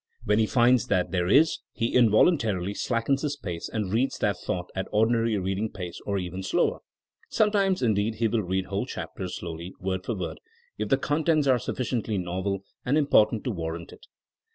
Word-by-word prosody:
When 105 +1 +2
he 110 - +3
finds 120 0 +3
that 90 -5 +1
there 90 -2 0
is 145 - +4
he 115 - -1
involuntarily 110 - +3
slackens 120 +5 0
his 145 -1 -2
pace 85 -10 -5
and 105 -3 -3
reads 125 +4 +1
that 100 -3 0
thought 90 0 -3
at 95 0 -2
ordinary 115 +1 +2
reading 95 +3 -1
pace 90 -3 -7
or 100 -1 0
even 90 0 -4
slower. 95 - +1 0.5
Sometimes 200 -6 +2
indeed 110 -1 +1
he 115 +1 +1
will 110 0 0
read 95 0 -1
whole 100 0 -3
chapters - - -5
slowly, 85 +3 -7
word 95 0 -2
for 115 - -2
word, 90 -3 -5 0.4
if - - -2
the 135 - +4
con 145 +3 -1
tents 155 -3 +3
are 130 -2 +4
sufficiently 115 -3 -2
novel 95 +2 -2 0.2
and 135 +4 +1
important 115 -7 +3
to 125 - -1
war 80 -5 -3
rant 85 0 -9
it. - - -16
110 Hz, 190 wpm, -26 LUFS, 95-125 Hz, 0.5 s, is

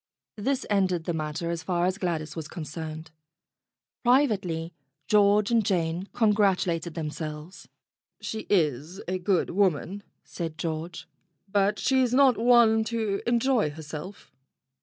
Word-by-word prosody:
This 265 +5 -1
ended 185 -4 +1
the 170 - -2
matter 155 +2 -3
as 170 -1 -3
far 175 -1 0
as 185 +2 -1
Gladys 165 -5 -2
was 160 -2 -5
con 165 - -7
cerned. 155 +1 -7 0.9
Privately 195 - +1 0.3
George 210 0 +4
and 230 -2 +3
Jane 175 -1 -1
congratulated 195 -7 +1
themselves. 155 +3 -6 0.5
"She 220 - -5
is 160 -1 0
a 185 +1 -2
good 180 0 +1
woman," 190 +1 0 0.2
said 165 -3 -6
George, 165 +1 -4 0.4
"but 200 +1 +1
she's 255 +1 +2
not 265 -2 +6
one 230 -2 +5
to 220 -4 -2
enjoy 240 - +2
herself." 155 +5 -9
185 Hz, 125 wpm, -27 LUFS, 160-215 Hz, 0.9 s, not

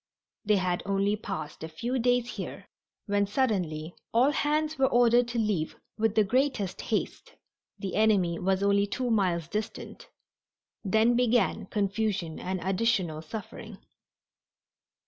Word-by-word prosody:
They 210 0 +4
had 185 -2 0
only 200 +1 +1
passed 195 -8 -6
a 160 - -5
few 240 +11 -2
days 245 0 +2
here - - -7 0.4
when 205 -1 +1
suddenly 180 - -1 0.2
all 250 +5 +4
hands 305 +1 0
were 265 - +5
ordered 240 0 +4
to 240 0 -4
leave 210 -8 0 0.2
with 220 -1 0
the 215 - +5
greatest 250 -3 0
haste - - -3 0.4
the 195 -3 -5
enemy 200 -6 +2
was 190 +1 +1
only 200 0 +3
two 245 +3 -2
miles 180 -6 +1
distant. 220 - -6 0.7
Then 220 +4 +3
began 235 -4 +2
confusion 200 -5 -1
and 185 0 -3
additional 190 -5 0
suffering. 200 +7 -8
205 Hz, 130 wpm, -28 LUFS, 185-235 Hz, 0.7 s, were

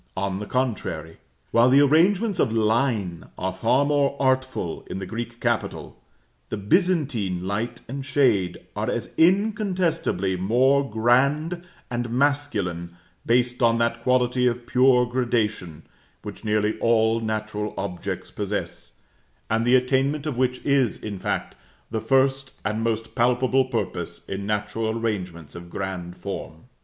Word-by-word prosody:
On 95 0 -1
the 105 - -6
contrary, 120 -10 -2 0.3
while 120 +2 +5
the 135 +2 +6
arrangements 185 +8 +3
of - - +2
line 110 -5 0
are 95 0 -2
far 115 +8 +2
more 140 -1 +1
artful 130 -9 0
in - - -4
the 95 - -4
Greek 120 +3 -6
capital, - - -2 0.5
the 110 - -3
Byzantine 115 - +1
light 115 +5 -3
and 135 +2 -5
shade 120 -10 +1
are - - -1
as - - -3
incontestably 180 - +1
more 130 +9 +2
grand 140 +10 +2 0.3
and 120 0 -2
masculine, 110 -11 -1 0.3
based 125 +1 +2
on 115 -1 +4
that 115 0 0
quality 125 0 +2
of 120 0 -1
pure 125 0 +4
gradation, 115 -9 -1 0.4
which - - -8
nearly 105 0 0
all 115 -1 +3
natural 110 -1 -3
objects 90 -3 -4
possess, - - -4 0.6
and 115 +1 +2
the 125 - +6
attainment 135 +3 +1
of 150 -4 -2
which 125 0 -1
is, 140 -5 +2
in 100 -3 -6
fact, - - -2 0.4
the 110 -1 -2
first 135 +2 +1
and 105 +2 -1
most 115 0 -2
palpable 125 +2 +2
purpose 120 -3 -4
in 100 +1 -4
natural 105 +2 -1
arrangements 90 -8 -4
of 85 0 -10
grand 90 -2 -5
form. 85 -5 -7
120 Hz, 135 wpm, -24 LUFS, 105-135 Hz, 0.6 s, the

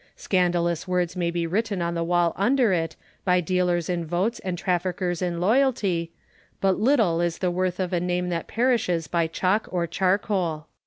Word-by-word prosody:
Scandalous 175 -3 0
words 180 -1 0
may 175 -2 0
be 170 0 -1
written 200 +3 -1
on 170 0 -1
the 170 0 -1
wall 175 0 +2
under 240 0 +2
it, 165 -2 -1 0.3
by 180 -1 +3
dealers 180 -1 0
in 175 -2 -1
votes 175 +8 -1
and 185 -2 -4
traffickers 180 0 -1
in 175 -2 -1
loyalty: 195 -6 +1 0.5
but 190 -1 +1
little 215 -9 +3
is 170 -1 -1
the 180 -2 0
worth 180 0 -1
of 185 -1 -2
a 175 - +2
name 180 0 -1
that 170 -1 -3
perishes 225 -9 +1
by 170 0 +1
chalk 185 +6 0
or 175 -2 -1
charcoal. 185 -3 0
180 Hz, 175 wpm, -25 LUFS, 170-190 Hz, 0.5 s, by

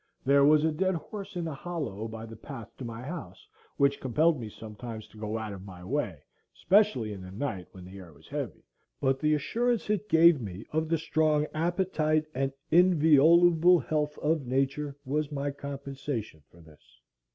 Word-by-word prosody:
There 140 +1 +5
was 150 +1 +5
a 160 - +2
dead 185 +4 0
horse 200 +3 -7
in 175 -1 -2
the 160 - -3
hollow 140 - -4
by 110 0 -7
the 115 0 -10
path 115 -1 -10
to - - -7
my 115 0 -6
house, 165 +6 -8 0.3
which 140 -1 +3
compelled 150 +4 +2
me 110 - -6
sometimes 110 +1 -8
to 110 - -17
go 110 +1 -3
out 110 -2 -5
of 95 -1 -9
my 90 -2 -11
way, 100 - -2 0.3
especially 185 - +2
in 95 - -8
the 95 - -9
night 100 -3 -4
when 90 -1 -12
the 95 +2 -10
air 90 -3 -12
was 75 +1 -19
heavy, 140 - -5 0.4
but 135 -1 +1
the 155 0 +3
assurance 235 +7 0
it 210 0 -1
gave 165 -3 +6
me 100 -1 -7
of 160 +1 -1
the 165 - +2
strong 155 -1 +1
appetite 160 -2 +1
and 135 +1 -1 0.2
inviolable 170 +1 +6
health 150 0 -2
of 150 -3 0
Nature 135 +2 -1
was 150 +2 -1
my 140 0 -2
compensation 135 - -6
for 85 - -18
this. 80 -2 -18
140 Hz, 185 wpm, -29 LUFS, 110-160 Hz, 0.4 s, gave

